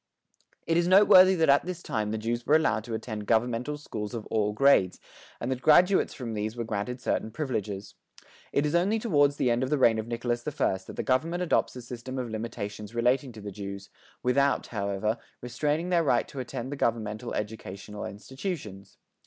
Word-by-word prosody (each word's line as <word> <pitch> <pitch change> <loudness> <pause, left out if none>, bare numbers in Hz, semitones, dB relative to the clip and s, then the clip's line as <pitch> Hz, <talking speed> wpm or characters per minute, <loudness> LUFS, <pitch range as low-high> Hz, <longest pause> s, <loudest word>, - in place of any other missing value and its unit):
It 165 - +1
is 170 0 +2
noteworthy 190 0 +7
that 165 -2 +2
at 140 +1 +5
this 180 -1 -6
time 105 -2 -2
the 110 - -2
Jews 120 +2 -2
were 150 - +5
allowed 115 -9 +2
to 115 - -4
attend 110 -2 -5
governmental 120 +5 +1
schools 110 -6 -6
of 110 - -5
all 105 -1 +1
grades, 105 -6 +3 0.4
and 120 - -3
that 130 -1 -2
graduates 180 +6 +5
from 120 -4 -5
these 110 +2 -3
were 120 - -2
granted 110 +3 -3
certain 110 - -1
privileges. 105 -7 -4 0.6
It 145 - +1
is 150 - -1
only 185 +6 +2
toward 145 -11 +3
the 130 -3 +1
end 120 +1 +1
of 130 - -1
the 150 - +2
reign 115 -4 +4
of 110 - -4
Nicholas 120 0 -2
I 135 -9 0
that - - -8
the - - -3
government 165 +7 0
adopts 175 - +1
a 125 - -8
system 125 +2 -7
of 125 -3 -3
limitations 110 -1 -5
relating 125 +3 +1
to 110 - -10
the 100 0 -6
Jews, 100 0 -7 0.3
without, 140 +3 +2
however, 100 +1 -2 0.2
restraining 150 +8 -1
their 175 -2 +3
right 120 -6 +2
to 140 - -7
attend 125 +1 -5
the - - -3
governmental 115 -1 -2
educational 105 -1 -6
institutions. 110 - -7
120 Hz, 195 wpm, -28 LUFS, 110-145 Hz, 0.6 s, noteworthy